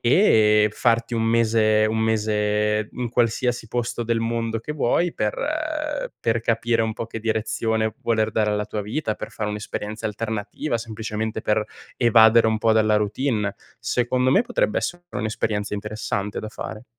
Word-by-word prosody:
e 110 - +5
farti 115 +1 +1
un 115 - 0
mese, 110 -1 +3
un 110 +1 -1
mese 105 -1 +1
in 125 -1 -3
qualsiasi 120 0 0
posto 120 +1 -2
del 115 0 0
mondo 115 0 -1
che 135 +7 -5
vuoi, 160 +4 +1
per 105 -1 0 0.9
per 115 0 +1
capire 115 0 +1
un 110 0 -1
po' 115 - -5
che 115 0 -7
direzione 110 0 -1
voler 110 -1 +1
dare 105 -1 +1
alla 105 0 -1
tua 105 -1 -4
vita, 110 +2 -2
per - - -7
fare 105 -1 -3
un'esperienza 105 +1 -5
alternativa, 110 +5 -3
semplicemente 110 -1 -4
per 105 0 +1 0.3
evadere 115 -1 +6
un 110 - 0
po' 110 0 +3
dalla 110 -1 +3
routine, 105 -1 -1 0.2
secondo 125 +3 +1
me 195 - +5
potrebbe - - 0
essere 175 0 -4
un'esperienza 105 -1 -2
interessante 105 -1 -3
da 110 - -6
fare. 110 +1 -7
110 Hz, 155 wpm, -23 LUFS, 105-115 Hz, 0.9 s, evadere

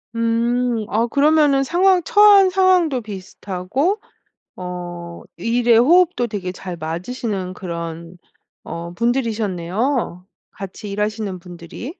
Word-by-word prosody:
음. 230 0 0
어 230 +3 +1
그러면은 285 0 +3
상황 360 +3 +3
처한 410 -3 +6
상황도 365 -7 +3
비슷하고 205 - -3 0.6
어 175 -1 -7
일의 230 +4 +3
호흡도 325 -2 +4
되게 190 -4 -4
잘 180 -1 -7
맞으시는 185 +4 -4
그런 170 -1 -6 0.5
어 170 +1 -7
분들이셨네요, 220 -2 -1 0.3
같이 200 +1 -8
일하시는 210 -2 -2
분들이. 175 +7 -9
220 Hz, 240 characters per minute, -20 LUFS, 180-270 Hz, 0.6 s, 처한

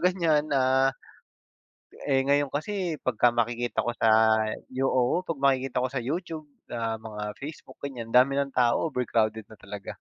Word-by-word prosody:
ganiyan, 165 -5 +2
ah, 130 0 +3 1.2
eh, 135 -2 +3
ngayon 145 +1 +2
kasi 170 +4 -3
pagka 125 -1 +3
makikita 120 +1 0
ko 120 - -1
sa - - +3 0.6
Yo 130 +1 0
oo, 130 +6 +2
pag 165 - -1
makikita 135 -2 +2
ko 130 - 0
sa 135 - -2
YouTube, 155 +4 -4 0.2
ah, 115 -1 -2
mga 105 -1 -6
Facebook, 150 +3 -9
ganiyan, 125 -5 -5
ang 115 - -4
dami 140 - -6
ng 140 -1 -3
tao, 120 +5 +3
overcrowded 110 -5 0
na 110 - -14
talaga. 100 0 -8
130 Hz, 160 wpm, -27 LUFS, 120-145 Hz, 1.2 s, ah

